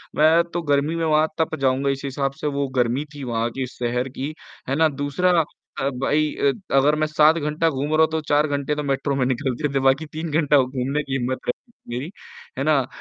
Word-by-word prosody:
मैं 160 +3 +5
तो 175 - -1
गर्मी 145 +1 +1
में 165 -1 -1
वहाँ 155 0 +3
तप 160 - 0
जाऊँगा, 135 +1 +2
इसी 140 +1 -2
हिसाब 135 0 -1
से - - -1
वो 140 -1 -1
गर्मी 125 +3 +1
थी 145 - -7
वहाँ 115 -2 -1
की 135 - -1
शहर 125 +1 -2
की, 140 +3 -5 0.4
है 135 - +1
ना? 160 +2 +4
दूसरा 155 +5 +1 0.4
अ, 135 - +1
भाई 150 +2 +1
अ, 140 - +2 0.2
अगर 140 +2 +4
मैं 155 0 0
7 155 +1 +4
घंटा 150 +1 0
घूम 135 -2 -2
रहा 155 - +4
हूँ 160 - +6
तो 160 - 0
4 150 +1 +3
घंटे 145 0 -1
तो 150 - -3
मेट्रो 140 0 -1
में 130 -2 +1
निकलते 130 +2 -1
थे 135 - +2
बाकी 135 +3 +2
3 160 +1 -4
घंटा 150 -1 +3
घूमने 130 +3 -2
की 135 - -6
हिम्मत 130 +1 -2
रहती 125 - -2
थी 120 - -9
मेरी, 135 +6 -4 0.5
है - - -1
ना? - - +3
अ, - - -2
140 Hz, 230 wpm, -22 LUFS, 135-155 Hz, 0.5 s, हूँ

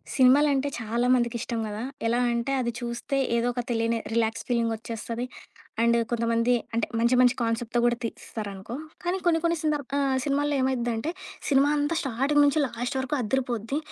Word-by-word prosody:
సినిమాలంటే 275 +1 +5
చాలామందికి 240 +1 +1
ఇష్టం 235 -3 -3
‌గదా! 210 +1 -5 0.3
ఎలా 235 +1 +2
అంటే 235 +3 -1
అది 235 - -1
చూస్తే 240 +4 -3 0.2
ఏదో 235 +1 +1
ఒక 245 - -2
తెలియని 230 0 +1 0.2
రిలాక్స్ 225 0 0
ఫీలింగొచ్చేస్తది. 230 0 -2 0.6
అండ్ 235 0 +4
కొంతమంది 230 +1 +2 0.2
అంటే 230 - +1
మంచి, 235 +2 +3
మంచి 250 0 +5
కాన్సెప్ట్‌తో 230 +1 0
కూడా 240 -1 +2
తీస్తారనుకో 210 -1 -6 0.3
కానీ 355 +2 0
కొన్ని‌కొన్ని 335 0 +2
సందర్బ్ 295 -4 -1
ఆహ్, 275 -2 +2
సినిమాలో 290 +1 +1
ఏమైద్దంటే, 240 0 0 0.4
సినిమా 275 0 +5
అంతా 295 +3 0
స్టార్టింగ్ 275 +3 +2
నుంచి 285 +2 +3
లాస్ట్ 245 +2 -4
వరకు 265 +2 -1
అదిరి‌పోద్ది. 240 +1 -1
240 Hz, 145 wpm, -26 LUFS, 230-275 Hz, 0.6 s, సినిమాలంటే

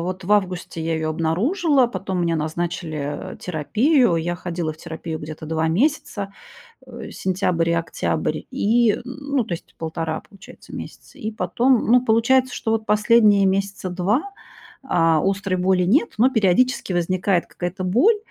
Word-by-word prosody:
вот 185 +2 -4
в 190 - -7
августе 180 -4 0
я 165 0 -1
её 160 0 -1
обнаружила, 250 - +2
потом 190 -5 -3
мне 165 -1 +1
назначили, 155 -2 -4
э, - - -12
терапию. 220 - +2
Я 175 +1 -1
ходила 170 -3 -3
в - - -16
терапию 160 0 -6
где-то 155 +1 -8
2 160 +1 0
месяца, 205 - 0 0.5
э, - - -9
сентябрь 180 -3 0
и - - +2
октябрь, 165 0 -1
и, 235 -3 +3
м, - - -7
ну, 280 0 -2
то 185 -5 -3
есть - - -12
1,5 160 0 -3
получается 195 -1 -14
месяца, - - -10
и 220 - -3
потом 225 +6 +1
Ну, 245 +2 +4
получается, 250 +3 +3
что 220 - -2
вот 220 -1 0
последние 210 -1 +4
месяца 195 -1 -1
2, 190 - +1 0.6
а, 165 - +2
острой 195 -1 0
боли 180 0 +2
нет, 235 - +2
но 250 +4 +6
периодически 220 -1 +2
возникает 180 +1 +1
какая-то 185 +1 -5
боль. 260 - +4
190 Hz, 155 wpm, -22 LUFS, 170-230 Hz, 0.6 s, но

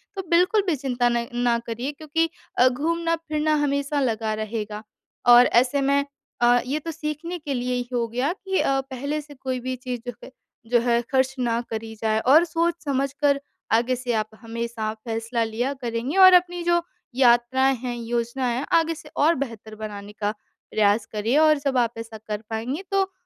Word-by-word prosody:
तो 385 - -2
बिल्कुल 365 +5 +4
भी 345 - +2
चिंता 250 -3 0
न 235 0 0
ना 240 -1 +2
करिए 235 +5 -3
क्योंकि 315 +2 -1 0.3
अ, 250 - +7
घूमना-फिरना 310 +1 0
हमेशा 280 0 0
लगा 225 -4 0
रहेगा 215 -1 -4 0.5
और 245 +1 +8 0.2
ऐसे 265 +3 -1
में 280 +1 +2 0.4
अ, 240 0 +5
ये 280 +4 -1
तो 330 +2 -5
सीखने 320 +2 -4
के 295 -3 -4
लिए 250 0 -1
ही 245 0 -3
हो 235 -1 0
गया 250 +8 -1
कि 385 0 -2
अ, 270 0 +2
पहले 275 +3 -4
से 295 0 -14
कोई 260 -1 -3
भी 255 +1 -3
चीज़ 250 -1 -5
जो - - -4
है - - -10 0.4
जो 240 - +5
है 235 0 +2
खर्च 265 0 +2
ना 235 -1 0
करी 220 0 -5
जाए 220 -1 +1
और 280 +8 +6
सोच-समझ 315 -5 -1
कर 285 -1 +2 0.3
आगे 240 +3 +3
से 245 -1 -3
आप 215 -1 -1
हमेशा 230 -1 -4
फ़ैसला 225 +1 -3
लिया 230 +5 -2
करेंगे 240 +7 -2
और 375 -1 +9
अपनी 355 -1 +3
जो 345 0 +3 0.3
यात्राएँ 260 +1 +4
हैं, 245 0 -4
योजनाएँ 235 +1 -2
हैं 265 - -2
आगे 330 0 -1
से 300 -1 -12
और 320 +3 +4
बेहतर 230 -5 -6
बनाने 210 -1 -7
का 205 -1 0 0.4
प्रयास 210 0 +2
करिए 220 +6 +1
और 310 0 +5
जब 275 -2 -1
आप 235 -1 +2
ऐसा 225 -1 -7
कर 210 -1 -3
पाएँगे 240 - -3
तो 390 -1 +1
255 Hz, 185 wpm, -24 LUFS, 230-300 Hz, 0.5 s, और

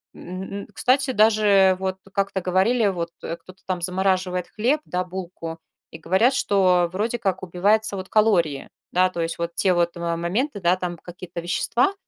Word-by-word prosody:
м, 190 +2 -7
кстати, 265 +1 +2
даже 210 -4 +4
вот 190 0 -2
как-то 195 0 -1
говорили 195 +6 +2
вот, 170 -3 -2
э, 165 - -4
кто-то 185 +2 -16
там 185 -2 -2
замораживает 185 0 0
хлеб, 250 +8 +1
да, 180 0 -2
булку, 175 -3 -7 0.3
и 160 - -10
говорят, 190 +10 +3
что 185 -7 +3
вроде 220 +6 -2
как 190 -4 -1
убиваются 200 +4 +1
вот 190 0 -6
калории. 175 -10 +2 0.2
Да, 185 +1 +3
то 170 - -3
есть 165 0 -2
вот 170 0 -3
те 185 +2 +2
вот, 170 0 +1
э, 170 0 -2
моменты, 205 - -2
да, 180 +1 +3
там 180 -1 -4
какие-то 175 0 -8
вещества, 235 - +1
185 Hz, 170 wpm, -23 LUFS, 175-205 Hz, 0.3 s, даже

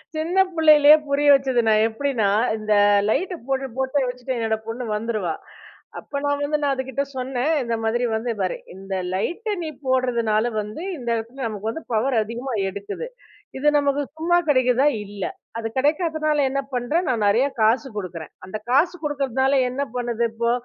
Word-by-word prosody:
சின்ன 325 +4 -2 0.2
புள்ளையிலே 305 -2 +7
புரிய 280 +1 +1
வச்சது 260 -3 +1
நான் 215 0 +4
எப்டின்னா, 230 -2 -1 0.2
அ - - 0
இந்த 215 0 0 0.4
லைட் 365 - 0
போட்டு 270 0 -1
போட்டு 265 +1 +1
வச்சுட்டு 250 +1 -4
என்னோட 225 -1 0
பொண்ணு 230 +2 -4
வந்துருவா. 210 -6 -2 0.7
அப்ப 280 - -5
நான் 285 0 +1
வந்து 295 +1 0
நான் 280 - +2
அதுகிட்ட 265 +1 -2
சொன்னேன். 255 +3 -1
இந்த 235 -1 -1
மாதிரி 230 +2 0
வந்து, 230 +2 -2
பாரு 185 -2 -1 0.2
இந்த 195 +1 -7 0.2
லைட்ட 415 - -2
நீ 315 - -3 0.2
போடுறதுனால 240 -3 +1
வந்து 210 +10 -7
இந்த 240 -3 -5
இடத்துல 235 +4 -5
நமக்கு 215 0 -4
வந்து 320 - -7
பவர் 245 +4 +1
அதிகமா 240 +4 -5 0.2
எடுக்குது. 200 - -6 0.5
இது 280 +3 0
நமக்கு 285 0 +1 0.2
சும்மா 345 +2 +2
கெடைக்குதா 255 -1 +3 0.2
இல்ல. 200 -1 -7 0.3
அது 225 -1 -3
கெடைக்காதனால 305 +1 +1
என்ன 275 +1 -1
பண்றேன், 290 +8 0
நான் 225 -4 +1
நெறையா 240 +8 +3
காசு 230 +6 +3
குடுக்குறேன். 170 -6 -6
அந்த 185 +3 -5
காசு 310 +7 +3
குடுக்குறதுனால, 270 -2 0 0.2
என்ன 265 +3 -2
பண்ணுது 235 -1 -1
இப்போ, 235 +1 0
255 Hz, 165 wpm, -23 LUFS, 225-285 Hz, 0.7 s, புள்ளையிலே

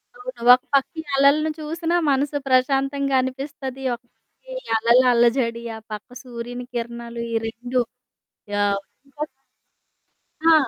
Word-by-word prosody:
అవును. 250 -1 -8
ఒక 255 - +4
పక్కీ 275 +4 +2 0.2
అలలను 295 +3 +4
చూసినా 330 +3 -1 0.2
మనసు 285 +2 +1
ప్రశాంతంగా 270 +1 +2
అనిపిస్తది, 265 0 -5
ఒక 235 - -19
పక్కీ - - -15
ఈ - - -23
అలల 235 +3 +5
అల్లజడి, 235 0 +2
ఆ - - -9
పక్క 210 +3 -7
సూర్యుని 245 0 -6
కిరణాలు, 235 0 -5
ఈ - - 0
2 245 +2 -1 0.7
యావ్ 200 -1 +2 0.3
ఇంకోక 295 +2 -5 1.2
ఆ! 330 - +8
255 Hz, 125 wpm, -23 LUFS, 235-280 Hz, 1.2 s, ఆ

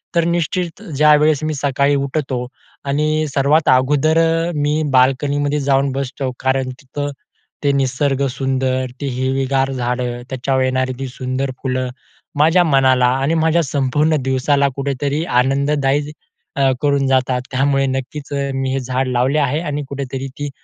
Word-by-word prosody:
तर 170 - +3
निश्चित 170 0 -1 0.2
ज्यावेळेस 150 0 +4
मी 155 0 -1
सकाळी 140 0 +1
उठतो 135 -2 -2 0.4
आणि 155 +2 0
सर्वात 145 +3 +2
अगोदर 145 +5 +3 0.4
मी 150 +1 0
बाल्कनीमध्ये 140 +3 +2
जाऊन 135 0 +1
बसतो 135 0 -3
कारण 130 0 0
तिथं 135 +2 -5 0.5
ते 145 - +3
निसर्ग 135 0 0
सुंदर, 130 0 -1 0.2
ते - - -2
हिरवीगार 135 +1 0
झाडं, 125 -1 -2
त्याच्यावर 130 0 0
येणारी 130 0 0
ती 135 - -3
सुंदर 130 +1 -3
फुलं 130 -1 -1 0.5
माझ्या 165 +4 +5
मनाला 130 -5 +3 0.2
आणि 140 +4 +1
माझ्या 160 +1 +3
संपूर्ण 145 +2 +1
दिवसाला 135 +2 +2
कुठेतरी 140 +2 -2 0.2
आनंददायी 140 +2 0 0.4
अ, 135 -1 +3
करून 140 -2 +2
जातात 130 -1 +1
त्यामुळे 135 +1 +2
नक्कीच 135 +2 -4 0.2
मी 135 0 -1
हे 135 - 0
झाड 130 +1 -2
लावले 130 +4 +1
आहे. 145 +1 +1
आणि 150 -3 -3
कुठेतरी 135 -1 -4
ती 145 0 -3
135 Hz, 135 wpm, -18 LUFS, 130-145 Hz, 0.5 s, माझ्या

